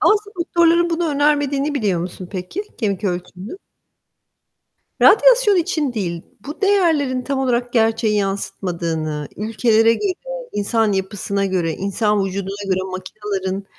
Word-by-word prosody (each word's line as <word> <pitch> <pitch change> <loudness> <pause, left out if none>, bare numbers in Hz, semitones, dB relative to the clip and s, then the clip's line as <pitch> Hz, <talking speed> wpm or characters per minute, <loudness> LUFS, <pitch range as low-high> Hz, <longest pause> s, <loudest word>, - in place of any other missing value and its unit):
Aslında 420 0 +2
doktorların 340 0 +3
bunu 335 0 0
önermediğini 290 0 +1
biliyor 205 -10 0
musun 180 +1 -6
peki? 190 - -4 0.2
Kemik 210 -3 -1
ölçümünün. 180 - -4 1.4
Radyasyon 475 -3 +6
için 320 -6 0
değil. 175 -7 -3 0.2
Bu 295 +3 -7
değerlerin 325 -11 +2
tam 275 +1 -2
olarak 245 -2 0
gerçeği 225 -2 +2
yansıtmadığını 170 -6 -3
ülkelere 225 +1 +3
göre 390 - -1 0.4
insan 210 +1 +1
yapısına 195 +1 -2
göre, 180 -4 0
insan 200 +3 0
vücuduna 195 +1 -4
göre 185 - -1
makinaların 190 0 -4
215 Hz, 120 wpm, -20 LUFS, 190-290 Hz, 1.4 s, Radyasyon